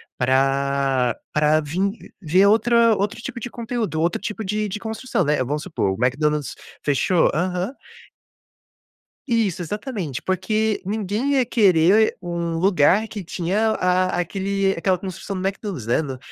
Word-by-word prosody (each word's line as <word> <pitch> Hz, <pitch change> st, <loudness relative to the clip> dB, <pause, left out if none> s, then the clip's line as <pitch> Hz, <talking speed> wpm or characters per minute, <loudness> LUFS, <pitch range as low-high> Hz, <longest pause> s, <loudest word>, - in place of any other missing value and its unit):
para 135 Hz, -1 st, +1 dB, 0.2 s
para 150 Hz, +1 st, +3 dB
vim 190 Hz, +8 st, -2 dB, 0.2 s
ver 185 Hz, +4 st, +4 dB
outra 230 Hz, +1 st, +4 dB
outro 210 Hz, +4 st, -2 dB
tipo 235 Hz, -, -6 dB
de 245 Hz, -, -6 dB
conteúdo, 230 Hz, -8 st, -3 dB
outro 170 Hz, +3 st, 0 dB
tipo 215 Hz, +1 st, -4 dB
de 210 Hz, +2 st, -1 dB
de 210 Hz, +2 st, -4 dB
construção, 220 Hz, -3 st, -2 dB
né. 145 Hz, -3 st, +1 dB
Vamos 150 Hz, +4 st, -3 dB
supor, 160 Hz, -, -1 dB
o 125 Hz, -, -2 dB
McDonald's 150 Hz, +2 st, 0 dB, 0.3 s
fechou 155 Hz, +5 st, +2 dB
aham. 180 Hz, -, -1 dB, 1.5 s
Isso, 215 Hz, -7 st, 0 dB
exatamente. 195 Hz, -, -4 dB
Porque 215 Hz, +3 st, 0 dB
ninguém 215 Hz, +6 st, -1 dB
ia 260 Hz, -3 st, +3 dB
querer 200 Hz, -2 st, +4 dB
um 170 Hz, -2 st, -3 dB
lugar 190 Hz, +3 st, +3 dB
que 205 Hz, -4 st, -7 dB
tinha 195 Hz, +6 st, 0 dB
a 185 Hz, -2 st, +1 dB
aquele 195 Hz, +2 st, 0 dB
aquela 185 Hz, +2 st, +1 dB
construção 190 Hz, +2 st, -6 dB
do 190 Hz, -, 0 dB
McDonald's, 195 Hz, -, -5 dB
né, 120 Hz, +6 st, +2 dB
no 135 Hz, -4 st, -5 dB
185 Hz, 145 wpm, -22 LUFS, 155-215 Hz, 1.5 s, ver